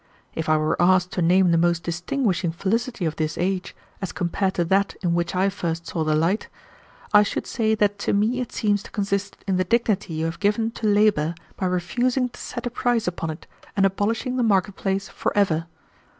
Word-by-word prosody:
If 160 -1 -3
I 155 - +5
were 155 +2 0
asked 180 0 +4
to 180 - -2
name 180 +1 +4
the 165 - +4
most 170 0 +2
distinguishing 180 +1 -1
felicity 200 +4 -1
of 160 -1 -2
this 155 -1 -2
age, 185 +1 -2 0.3
as 195 - -3
compared 190 +2 -1
to 175 - +1
that 195 +3 +1
in 175 -2 +1
which 170 +1 -1
I 190 +2 +3
first 170 -3 -3
saw 165 - -2
the 155 0 +1
light, 170 +7 +1 0.7
I 210 - +8
should 205 - -1
say 220 -2 +1
that 205 -1 +1
to - - 0
me 220 +5 +1
it 245 - -5
seems 205 -2 +1
to - - -12
consist 200 -1 -2
in 190 -2 +1
the 185 - +2
dignity 200 -4 0
you 160 +1 -1
have 165 +1 -4
given 210 +2 +1
to 225 -1 -3
labor 205 -6 +3 0.2
by 185 - -1
refusing 245 +8 0
to - - -14
set 240 - -6
a 245 - -2
price 240 -2 0
upon 170 -2 -2
it 155 +1 -7 0.3
and 195 - +5
abolishing 220 +6 0
the - - +2
market 200 -3 +2
place 195 +1 -2
forever. 165 -5 0
195 Hz, 205 wpm, -23 LUFS, 170-210 Hz, 0.7 s, I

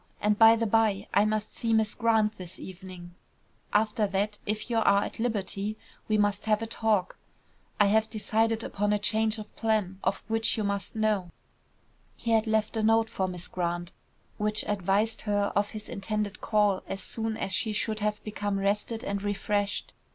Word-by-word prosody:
And, 210 0 +1
by 225 0 +9
the 230 0 0
bye, 215 -2 +2
I 205 - +5
must 215 0 -2
see 230 -2 0
Miss 220 -1 +3
Grant 220 -2 +2
this 185 0 -8
evening; 185 -2 -10 0.6
after 215 0 +2
that, 200 +2 -1
if 215 +1 -1
you 235 -1 0
are 200 -2 +4
at - - -7
liberty, 210 -2 -2 0.3
we 215 - +2
must 205 0 +1
have 215 0 +2
a - - -1
talk. 220 -4 0 0.6
I 205 - +6
have 220 +2 +3
decided 225 +1 0
upon 205 +1 0
a - - +3
change 220 +1 +1
of 215 -1 -10
plan, 210 -4 0
of 190 +1 0
which 225 +1 +1
you 215 - 0
must 200 +1 -3
know." 215 -5 +1 0.9
He 230 - -2
had 225 0 +3
left 220 0 +1
a 220 - +1
note 225 +1 +3
for 190 -4 -1
Miss 180 -1 -3
Grant, 175 0 -3 0.5
which 210 0 0
advised 205 +2 +1
her 205 0 +1
of 205 0 +2
his 215 -1 -8
intended 210 0 -3
call 210 -3 +2
as 195 - -3
soon 225 -1 -2
as 195 - -2
she 215 +3 0
should 215 0 -2
have 210 0 -1
become 205 -1 -2
rested 205 +4 -1
and 200 -3 -2
refreshed. 205 0 -1
210 Hz, 180 wpm, -28 LUFS, 200-220 Hz, 0.9 s, by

